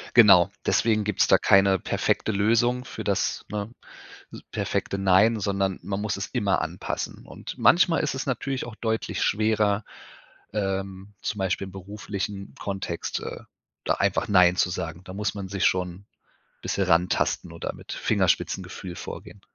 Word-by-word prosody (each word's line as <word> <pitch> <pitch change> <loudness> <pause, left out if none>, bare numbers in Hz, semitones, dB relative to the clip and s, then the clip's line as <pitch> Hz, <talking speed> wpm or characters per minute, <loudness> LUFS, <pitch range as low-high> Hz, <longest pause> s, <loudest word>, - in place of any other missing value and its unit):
Genau, 100 -7 +8 0.2
deswegen 110 -2 +2
gibt's 105 -1 +2
da - - +6
keine 95 -1 +4
perfekte 110 - 0
Lösung 115 +5 +2
für - - -7
das, - - -1
ne, 105 +2 -4 0.8
perfekte 100 - -2
„Nein“, 100 +4 +4
sondern 95 -1 0
man 100 0 -3
muss 105 -1 -2
es 100 - -3
immer 105 -6 +1
anpassen. 80 +3 -4
Und - - -8
manchmal 175 -1 +5
ist 150 - -1
es 135 - -4
natürlich 135 +1 -2
auch 115 - -8
deutlich 110 -1 -2
schwerer, 105 -1 +2 0.7
ähm, 95 -1 -3
zum 105 - -3
Beispiel 95 0 -1
im 95 - -11
beruflichen 100 0 -6
Kontext, 95 -4 -3
äh, - - -6 0.4
da - - +2
einfach - - 0
„Nein“ 90 -2 +5
zu 90 - +2
sagen. 85 -1 -5
Da 95 - -9
muss 105 +2 -2
man 100 -2 -6
sich 100 -1 -2
schon 90 +2 -1 0.6
bisschen - - 0
rantasten 85 +2 +1
oder - - -5
mit - - -10
Fingerspitzengefühl 90 -2 -1
vorgehen. - - -9
100 Hz, 150 wpm, -25 LUFS, 95-110 Hz, 0.8 s, Genau